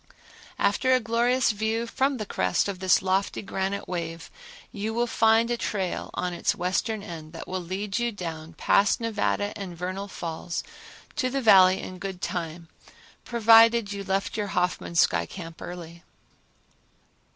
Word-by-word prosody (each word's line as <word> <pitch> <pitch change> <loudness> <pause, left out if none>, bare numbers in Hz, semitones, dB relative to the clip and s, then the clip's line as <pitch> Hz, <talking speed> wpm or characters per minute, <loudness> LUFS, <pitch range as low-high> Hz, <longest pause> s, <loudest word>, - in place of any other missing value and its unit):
After 205 +6 +2
a - - +3
glorious 235 +2 +2
view 220 +2 -1
from 270 +3 0
the 215 - -4
crest 90 - 0
of 195 -2 -4
this 185 0 +3
lofty 190 +2 0
granite 195 0 -3
wave 165 -2 -5 0.4
you 215 +2 -4
will 240 +1 +2
find 225 0 +3
a 240 - 0
trail 195 -5 -3
on 180 -1 -2
its 175 - 0
western 195 +4 -1
end 160 -5 -9
that 165 - -8
will 185 0 -3
lead 195 +5 -3
you 240 0 0
down 165 -5 -6
past 200 +5 +3
Nevada 210 -2 -1
and 185 -4 -7
Vernal 185 +3 -4
Falls 170 -2 -5 0.5
to 255 -3 +1
the 275 +2 -1
Valley 190 -6 +6
in 185 0 -8
good 190 -1 -5
time, 170 -1 -4 0.6
provided 230 -2 +5
you 200 0 -5
left 195 0 -1
your 210 -2 -2
Hoffman 180 -1 -1
sky - - +3
camp 165 -3 -9
early. 170 -1 -8
195 Hz, 155 wpm, -26 LUFS, 180-225 Hz, 0.6 s, Valley